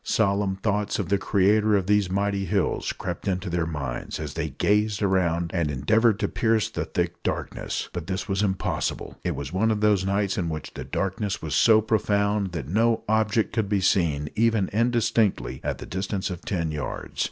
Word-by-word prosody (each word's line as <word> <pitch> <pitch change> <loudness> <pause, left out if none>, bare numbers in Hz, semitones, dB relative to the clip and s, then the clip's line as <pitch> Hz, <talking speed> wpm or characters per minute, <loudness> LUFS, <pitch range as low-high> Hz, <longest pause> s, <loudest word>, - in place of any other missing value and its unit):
Solemn 100 -2 +1
thoughts 105 +1 -1
of 95 -5 -3
the 100 0 +2
Creator 105 +2 +3
of 95 -2 +1
these 105 -2 +2
mighty 100 +1 0
hills - - 0
crept - - -5
into 90 -2 -1
their 85 -1 0
minds 70 -6 -4
as - - -5
they - - -2
gazed 105 0 +1
around 85 -3 +1
and 85 -5 0
endeavoured 105 - +3
to - - +1
pierce 110 -2 +1
the - - -3
thick - - -2
darkness. - - -3
But 85 -2 -5
this 95 0 -3
was 100 -1 0
impossible. 95 -2 -2
It - - -1
was 70 +3 -6
one 105 +4 +2
of 110 -1 +1
those 105 -3 +3
nights 100 0 0
in 85 -2 -1
which 75 -2 -6
the - - -6
darkness 100 +1 -2
was 80 -2 -5
so 110 +4 +6
profound 100 -2 +1
that 70 -7 -4
no 115 +7 +2
object 110 0 +1
could 110 -4 0
be 100 -1 +2
seen 80 -7 +1
even 110 -3 +2
indistinctly 115 - +1
at - - -2
the - - -8
distance 95 +1 -3
of 90 - -6
ten 85 -5 -2
yards. 75 -1 -5
100 Hz, 190 wpm, -25 LUFS, 90-105 Hz, -, so